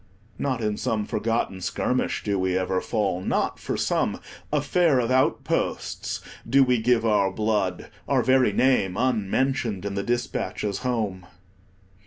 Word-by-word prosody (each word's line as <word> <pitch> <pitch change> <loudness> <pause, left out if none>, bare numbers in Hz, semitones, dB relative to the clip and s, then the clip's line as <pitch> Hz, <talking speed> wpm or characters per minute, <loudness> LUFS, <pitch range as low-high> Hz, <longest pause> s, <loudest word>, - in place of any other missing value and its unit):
Not 130 -4 -1
in 105 -1 -1
some 105 -2 -1
forgotten 110 -4 -1
skirmish 125 +7 -1
do 100 -2 0
we 95 0 +1
ever 95 0 0
fall; 100 -5 -1
not - - -1
for - - -3
some - - 0 0.3
"affair 150 +1 +2
of 120 0 0
outposts" 130 +1 0 0.3
do 135 0 +6
we 125 -3 +2
give 120 0 +2
our 105 -3 +3
blood, 105 -3 -1 0.2
our - - +2
very 130 -3 +4
name 100 -5 +2
unmentioned 115 -2 0
in 100 - -2
the 100 - -1
dispatches 105 -3 -2
home. 110 -8 -2
110 Hz, 140 wpm, -25 LUFS, 100-125 Hz, 0.3 s, do